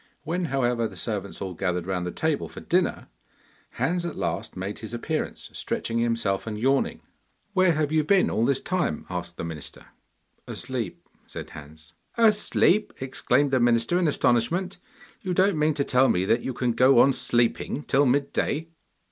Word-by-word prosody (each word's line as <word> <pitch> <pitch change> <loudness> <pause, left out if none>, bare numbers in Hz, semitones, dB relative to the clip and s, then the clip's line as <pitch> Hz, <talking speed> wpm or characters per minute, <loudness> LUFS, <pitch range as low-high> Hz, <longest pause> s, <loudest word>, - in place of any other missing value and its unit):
When, 175 +3 -1
however, 125 -5 0
the - - -12
servants 100 -3 -4
all 95 -1 -4
gathered 90 -1 -2
round 90 -2 -2
the - - -3
table 160 - -1
for - - -9
dinner, 180 +1 0 0.7
Hans 175 +1 0
at 170 -2 -4
last 85 +2 -3
made 95 +3 -4
his 115 +1 -6
appearance 115 - -3
stretching 115 0 -2
himself 115 -4 0
and 105 -1 -3
yawning. 135 +5 +1 0.5
'Where 185 -3 +4
have 155 -1 0
you 155 -1 +3
been 185 +4 +3
all 110 - +1
this 135 +2 +2
time?' 180 - -1
asked 90 -1 -5
the - - -4
minister. 80 -3 -7 0.6
'Asleep,' 125 -7 -5 0.2
said - - -8
Hans. 80 +2 -12 0.2
'Asleep!' 215 -2 +3
exclaimed 135 +2 +1
the 130 - +3
minister 120 +8 +3
in 175 - +2
astonishment. 165 +9 +1 0.4
'You 185 -2 -2
don't 190 -3 +3
mean 150 0 +2
to 140 - +1
tell 130 -1 +3
me 90 +1 +2
that 115 +4 +2
you 130 - -3
can 125 -1 0
go 130 +3 +5
on 135 +3 +6
sleeping 120 +3 0
till 140 0 +3
mid 140 +2 +1
day? 160 +3 -1
130 Hz, 175 wpm, -25 LUFS, 105-155 Hz, 0.7 s, on